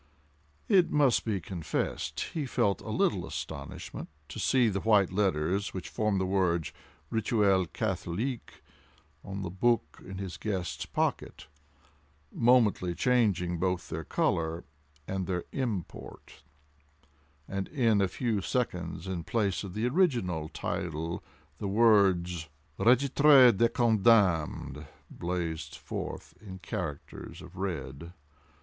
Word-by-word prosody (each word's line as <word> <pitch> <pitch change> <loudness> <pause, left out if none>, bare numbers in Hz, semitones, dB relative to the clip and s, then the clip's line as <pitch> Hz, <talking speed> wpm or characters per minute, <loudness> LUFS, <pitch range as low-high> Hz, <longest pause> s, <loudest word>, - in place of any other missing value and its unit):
It 190 -5 +5
must 140 -5 +3
be 105 -4 0
confessed, 85 -2 -3
he 150 -4 -2
felt 100 -5 +1
a - - -8
little - - +1
astonishment - - -6 0.2
to - - -7
see 125 -3 +3
the 100 -2 0
white 105 -3 +3
letters 95 0 0
which 90 -3 -5
formed 105 +3 0
the 95 - 0
words 90 -5 0 0.4
"Rituel 100 -4 +2
Catholique" 110 +11 -3 0.6
on 100 0 -5
the 90 - -4
book 95 -5 0
in 95 +1 -8
his 95 -2 -5
guest's 90 -8 -3
pocket, - - -2 0.9
momently 115 -7 +3
changing 100 -9 +1
both 90 -1 -1
their 80 +1 -4
color 80 +2 0 0.4
and 95 -2 -3
their 90 -2 -1
import, 115 - -5 1.1
and 95 0 -3
in 115 -8 +2
a 95 - +3
few 110 +1 -1
seconds, 90 -7 -2
in 95 -3 -3
place 100 0 0
of 95 -3 -7
the 110 +3 0
original 120 - +1
title 80 0 -4 0.4
the 100 - -3
words 95 -6 +3 0.3
Régitre 130 0 +6
des 115 +4 +3
Condamnes 100 - +2 0.3
blazed 85 -2 -3
forth - - -6
in 95 -3 -8
characters 85 -5 -6
of - - -13
red. 85 -3 -5
95 Hz, 120 wpm, -29 LUFS, 85-115 Hz, 1.1 s, Régitre